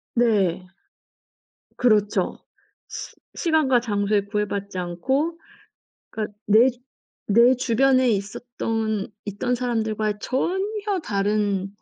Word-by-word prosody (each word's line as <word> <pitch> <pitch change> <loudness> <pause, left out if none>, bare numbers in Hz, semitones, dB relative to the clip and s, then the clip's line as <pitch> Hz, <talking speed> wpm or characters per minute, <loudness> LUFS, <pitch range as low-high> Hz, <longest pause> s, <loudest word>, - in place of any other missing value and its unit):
네. 205 -7 +2 1.1
그렇죠. 210 -4 +2 0.5
시 - - -8 0.2
시간과 310 -7 +2
장소에 205 -3 0
구애받지 200 -1 -3
않고 265 - -1 0.7
그러니까 210 -1 -5
내 220 +5 +6
주 245 - -17 0.5
내 235 +4 +6
주변에 255 +1 +3
있었던 220 0 -2 0.2
있던 210 +5 -2
사람들과 220 -4 -1
전혀 390 - -1
다른 205 - 0
220 Hz, 205 characters per minute, -23 LUFS, 205-255 Hz, 1.1 s, 내